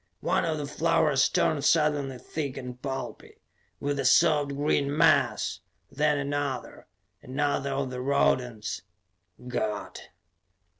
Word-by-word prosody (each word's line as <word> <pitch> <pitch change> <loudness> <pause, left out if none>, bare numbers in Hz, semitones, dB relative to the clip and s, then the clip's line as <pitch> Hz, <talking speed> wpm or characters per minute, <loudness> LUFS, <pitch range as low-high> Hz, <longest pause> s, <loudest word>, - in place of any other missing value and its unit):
One - - +1
of 160 -2 -1
the 145 - -3
flowers 150 -1 +2
turned 145 -3 +1
suddenly 150 -4 +2
thick 140 +1 -5
and 125 -1 -7
pulpy 135 -1 -6 0.4
with 145 0 -2
the 135 - -2
soft 150 +1 +4
green 145 0 0
mass, - - +3 0.3
then 150 +1 +2
another, 140 -2 -3 0.3
another 140 +1 -1
of 135 -1 -2
the 125 0 -4
rodents... 125 -6 0 0.6
_God! 110 -4 -4
140 Hz, 115 wpm, -27 LUFS, 130-150 Hz, 0.6 s, soft